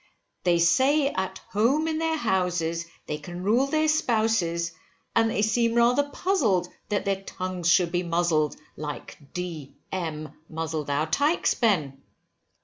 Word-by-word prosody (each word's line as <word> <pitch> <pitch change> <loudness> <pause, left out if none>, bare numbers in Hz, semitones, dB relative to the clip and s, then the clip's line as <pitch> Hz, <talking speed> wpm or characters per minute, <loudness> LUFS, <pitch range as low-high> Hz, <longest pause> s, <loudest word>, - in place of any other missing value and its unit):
They 175 -1 +4
say, 270 - +4
at 190 -5 -3
home 250 +11 +2
in 315 -1 -1
their 325 0 0
houses, 175 - 0 0.2
they 150 - -4
can 175 +4 -7
rule 235 +7 +3
their 310 +2 +1
spouses, 220 - +1 0.4
and 225 0 +4
they 210 - 0
seem 230 +1 +2
rather 245 +5 +3
puzzled, 230 - +1 0.2
that 205 -1 -1
their 195 -1 0
tongues 185 -2 -3
should 175 -1 +4
be 175 0 +1
muzzled, 170 -3 +1 0.2
like 150 -1 -7 0.2
D 170 -6 -5 0.2
M 160 -4 -4 0.2
muzzled 160 -2 -3
our 145 +2 +1
tykes, 285 - +2
Ben. 155 - 0
185 Hz, 140 wpm, -26 LUFS, 170-235 Hz, 0.4 s, They